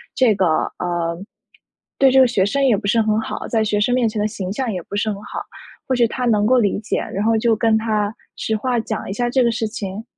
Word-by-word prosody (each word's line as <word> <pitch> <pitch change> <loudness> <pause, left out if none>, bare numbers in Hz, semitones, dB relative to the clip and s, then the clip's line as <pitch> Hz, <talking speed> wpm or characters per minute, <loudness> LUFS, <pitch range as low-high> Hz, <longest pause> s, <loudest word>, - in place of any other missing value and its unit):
这 250 -4 +4
个 190 -1 +1 0.3
呃， 170 -1 -2 0.8
对 270 -1 +5
这 265 - +5
个 260 - +7
学 205 -6 +1
生 275 +8 0
也 250 -5 +4
不 205 - -7
是 225 +2 +3
很 215 0 +1
好， 225 - -5
在 225 -2 +1
学 210 -1 0
生 230 +4 +2
面 250 -2 +2
前 215 -1 -2
的 210 - +1
形 190 -3 -5
象 250 +1 -2
也 185 -3 -4
不 200 - -8
是 210 +2 0
很 - - -4
好。 - - -6 0.5
或 260 - +1
许 240 -2 +3
他 250 +2 -3
能 210 -3 +2
够 255 +2 +4
理 205 -5 +1
解， 215 - -2 0.2
然 200 +2 -1
后 225 0 +3
就 225 0 +2
跟 220 0 +2
他 215 -2 0 0.3
实 220 - -1
话 245 +2 0
讲 220 -1 -4
一 - - -3
下 240 +3 -1
这 255 +1 +2
个 235 - +2
事 225 -1 -2
情？ 205 0 -6
220 Hz, 275 characters per minute, -20 LUFS, 205-240 Hz, 0.8 s, 个